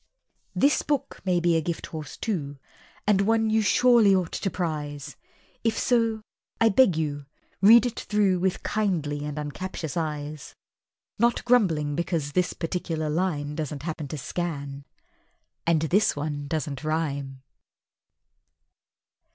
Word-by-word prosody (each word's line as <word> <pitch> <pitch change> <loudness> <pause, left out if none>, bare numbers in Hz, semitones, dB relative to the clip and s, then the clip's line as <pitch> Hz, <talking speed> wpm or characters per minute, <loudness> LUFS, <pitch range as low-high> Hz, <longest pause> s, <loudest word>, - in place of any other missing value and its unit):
This 285 +2 +3
book 290 -3 -2
may 180 -2 +2
be 170 -1 +2
a 165 - +2
Gifthorse 160 -2 -5
too, 145 -10 -3 0.5
And 205 -2 +3
one 225 +1 +2
you 220 0 +3
surely 225 -1 +5
ought 180 -3 0
to 195 - -2
prize; 145 -5 -4 0.5
If 225 -1 +1
so, 230 -3 +1 0.4
I 225 - +5
beg 205 -5 +4
you, 145 -3 -3 0.3
read 230 +5 +8
it 245 -1 -3
through 200 -3 +1
With 185 +1 -1
kindly 160 -9 -1
and 150 0 -5
uncaptious 150 +1 -5
eyes, 150 -3 -4 0.6
Not 235 0 +2
grumbling 165 -12 +2
because 165 -3 -2
this 180 +4 +1
particular 165 -2 -3
line 150 -4 -1
doesn't 150 -2 -4
happen 155 -2 -4
to 155 - -5
scan, 140 -2 -4 0.8
And 165 -2 +3
this 190 +7 +2
one 145 -1 -4
doesn't 145 -2 -3
rhyme! 140 -4 -2
165 Hz, 130 wpm, -26 LUFS, 145-200 Hz, 0.8 s, read